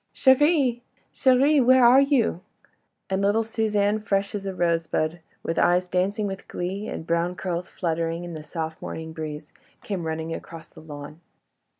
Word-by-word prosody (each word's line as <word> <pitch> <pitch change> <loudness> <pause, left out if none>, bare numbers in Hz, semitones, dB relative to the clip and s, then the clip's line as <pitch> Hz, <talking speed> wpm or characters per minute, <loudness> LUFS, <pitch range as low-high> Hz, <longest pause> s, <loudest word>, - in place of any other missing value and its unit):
"Chérie!—chérie! 265 0 +3
where 255 0 +6
are 255 +3 +7
you?" 265 - +1 0.7
and 190 0 -1
little 205 +3 +2
Suzanne, 215 -2 0
fresh 200 -1 -1
as 200 -1 -4
a 190 - -4
rosebud, 165 -1 0 0.2
with 165 - -1
eyes 180 +1 +3
dancing 195 +4 0
with 195 -1 -6
glee, 190 +4 -4
and - - -6
brown 170 +2 0
curls 180 -1 -3
fluttering 165 0 -2
in 175 -1 -7
the 155 - -6
soft 160 0 -5
morning 160 0 -6
breeze, 150 -1 -7 0.3
came 185 -6 -3
running 160 +1 -3
across 165 0 -9
the - - -15
lawn. 150 +1 -10
185 Hz, 155 wpm, -25 LUFS, 165-220 Hz, 0.7 s, are